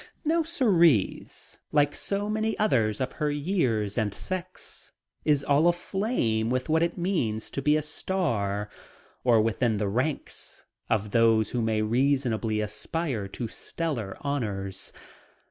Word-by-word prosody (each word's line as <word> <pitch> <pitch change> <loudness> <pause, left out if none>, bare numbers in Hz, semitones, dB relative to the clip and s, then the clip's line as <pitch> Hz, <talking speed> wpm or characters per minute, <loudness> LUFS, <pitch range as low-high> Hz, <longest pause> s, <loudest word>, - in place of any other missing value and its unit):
Now 330 +2 +3
Cerise, 190 - +2
like 145 -1 +3
so 200 +1 -1
many 220 +1 0
others 115 - +2
of 130 0 -1
her 150 -2 -1
years 135 - 0
and 105 -2 0
sex, 185 -1 -6 0.3
is 145 -2 +3
all 145 +4 +4
aflame 175 - 0
with 130 +3 -1
what 160 +1 +3
it 170 +2 0
means 160 - -1
to 140 - -3
be 150 +2 +4
a 155 - -1
star 110 - -1 0.6
or 120 -3 +5
within 115 0 +1
the 100 0 0
ranks 130 +9 -3 0.2
of 105 -1 0
those 115 -2 +4
who 120 - 0
may 110 -1 +1
reasonably 120 -2 +1
aspire 110 +2 -2
to 115 +4 -5
stellar 120 -6 -4
honors. 105 -9 -3
130 Hz, 135 wpm, -27 LUFS, 110-170 Hz, 0.6 s, or